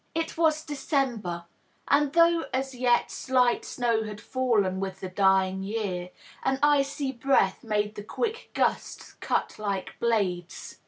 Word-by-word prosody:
It 330 0 -2
was 315 -1 +2
December, 260 - -2 0.4
and 290 -1 +3
though 335 0 +4
as 265 +1 -2
yet 245 -1 +2
slight 250 -2 +1
snow 235 -2 0
had 210 -1 -7
fallen 215 -7 0
with 190 -1 -4
the 185 - -5
dying 190 0 +2
year, 195 -3 -3 0.3
an 265 0 +1
icy 280 -1 +2
breath 240 -6 +1
made 210 -2 -1
the 205 - -8
quick 450 - -3
gusts - - -1
cut - - -1
like 200 -3 -3
blades. 190 -6 -1
230 Hz, 140 wpm, -27 LUFS, 195-275 Hz, 0.4 s, though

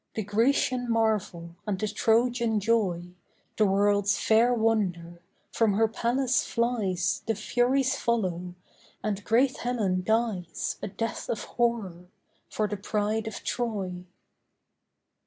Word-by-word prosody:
The 220 - -2
Grecian 245 +4 +1
marvel, 210 -7 -1
and 200 -2 0
the 215 - -1
Trojan 230 +1 +2
joy, 190 -5 0 0.5
The 215 - +4
world's 205 +1 +2
fair 225 +2 +4
wonder, 190 -8 0 0.3
from 225 -3 +2
her 220 +3 +3
palace 245 +3 +1
flies 205 -7 0
The 225 - +1
furies 250 +5 +1
follow, 180 -6 -1 0.5
and 205 -1 -2
great 250 +5 +2
Helen 210 -7 -1
dies, 220 -5 -1
A - - -3
death 225 +3 -4
of 225 - -2
horror, 210 -8 -2 0.4
for 215 - -1
the 210 - -4
pride 210 +2 -1
of 220 - -6
Troy. 195 -7 -3
215 Hz, 120 wpm, -27 LUFS, 190-235 Hz, 0.5 s, The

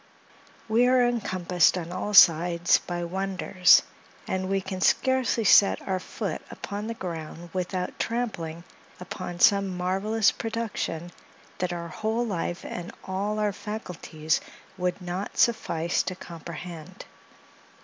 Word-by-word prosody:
We 230 +3 +4
are 250 -1 +4
encompassed 185 -7 +2
on 170 -1 -5
all 205 +3 -3
sides 175 -1 +6
by 175 -1 -4
wonders, 185 0 +3 0.4
and 190 0 -2
we 195 0 +1
can 190 0 -6
scarcely 260 0 +2
set 200 -1 +6
our 190 -1 0
foot - - -5
upon 205 +1 -6
the 230 - -4
ground, 170 -3 -7
without 180 0 -3
trampling 175 -9 -3 0.4
upon 180 -1 -6
some 200 -3 +4
marvellous 195 +4 +2
production 220 -7 -4 0.5
that 180 -1 -1
our 170 -1 -5
whole 220 +6 -1
life 175 -4 -3
and 175 0 -6
all 200 +3 -2
our 210 -1 0
faculties 175 -7 -3 0.3
would 180 0 -2
not 180 +3 -5
suffice 170 -7 +1
to 185 0 -4
comprehend. 170 -1 -9
185 Hz, 125 wpm, -26 LUFS, 175-210 Hz, 0.5 s, sides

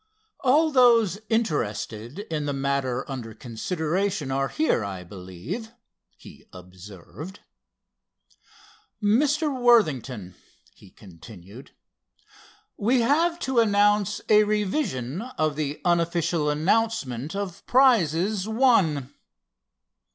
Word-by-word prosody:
"All 305 +5 +3
those 230 - +4
interested 120 - -2 0.2
in 150 -2 -2
the 145 - -1
matter 135 -2 -1
under 120 -5 -7
consideration 160 - -2
are 135 +1 0
here, 310 - 0
I 95 -2 -6
believe," 100 - -8 0.4
he - - -15
observed. 95 - -11 1.6
"Mr. 285 +7 +1
Worthington," 135 - +2 0.4
he 100 - -18
continued, 95 - -14 1.1
"we 240 +4 +2
have 330 +8 +2
to 265 -2 +1
announce 205 -1 +2
a 215 0 +6
revision 200 - -2 0.2
of 155 -2 0
the 150 -1 -3
unofficial 170 -2 +1
announcement 155 - -1
of 200 -3 -5
prizes 205 - +3
won." 195 - +2
170 Hz, 90 wpm, -25 LUFS, -, 1.6 s, a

